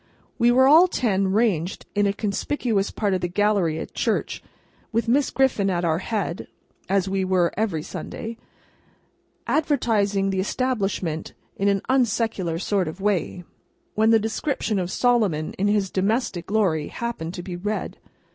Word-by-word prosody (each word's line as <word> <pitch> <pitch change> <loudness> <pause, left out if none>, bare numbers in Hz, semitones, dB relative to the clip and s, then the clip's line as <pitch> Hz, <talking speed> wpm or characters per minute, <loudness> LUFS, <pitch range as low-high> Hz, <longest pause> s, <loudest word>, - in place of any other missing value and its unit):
We 235 0 +5
were 255 +2 +5
all 325 +6 +7
ten 200 - 0
ranged 190 -4 0
in 205 0 +2
a - - +2
conspicuous 205 +1 -1
part 205 -3 -1
of 185 - 0
the 175 - 0
gallery 190 -3 +1
at - - -6
church, - - -1 0.5
with 230 +1 0
Miss 270 +4 +3
Griffin 245 -7 +2
at 175 -2 0
our 160 0 +1
head—as 195 -1 -3
we 190 0 0
were 185 -2 +2
every 190 -8 -1
Sunday—advertising 225 - -3
the 190 - -1
establishment 195 -7 -2 0.2
in 200 - 0
an 200 -1 +2
unsecular 225 -9 +1
sort 195 -2 0
of 160 +4 -6
way—when 200 +3 -2
the 225 - +6
description 220 0 -1
of 180 -1 -2
Solomon 210 -11 +1
in 200 - +2
his 205 -2 +1
domestic 195 -2 -1
glory 190 -8 +1
happened 190 -8 -5
to 175 - -6
be 180 -1 -6
read. 210 +4 -4
200 Hz, 145 wpm, -23 LUFS, 185-225 Hz, 0.5 s, all